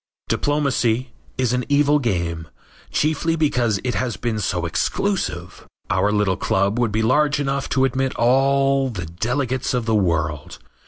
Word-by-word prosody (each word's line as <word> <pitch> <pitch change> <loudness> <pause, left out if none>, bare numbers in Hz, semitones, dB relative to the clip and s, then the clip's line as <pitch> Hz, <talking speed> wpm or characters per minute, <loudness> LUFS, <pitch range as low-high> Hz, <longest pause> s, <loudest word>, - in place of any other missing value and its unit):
Diplomacy 130 -4 0 0.3
is 125 -2 +1
an 125 0 0
evil 145 +1 +3
game, 85 - -2 0.4
chiefly 160 +2 0
because 125 -9 +1
it 125 -1 -1
has 125 -3 -2
been 115 -3 -2
so 90 -3 -1
exclusive. 90 - -2 0.2
Our 105 - +2
little 105 -3 +1
club 100 +3 0
would 120 -3 +1
be 110 +2 0
large 145 +5 +2
enough 140 -1 -2
to 135 0 +2
admit 130 0 -1
all 135 +2 +2
the 90 -8 -5
delegates 125 - -2
of 120 -2 -1
the 115 - 0
world. 85 -7 -1
125 Hz, 150 wpm, -21 LUFS, 100-140 Hz, 0.4 s, evil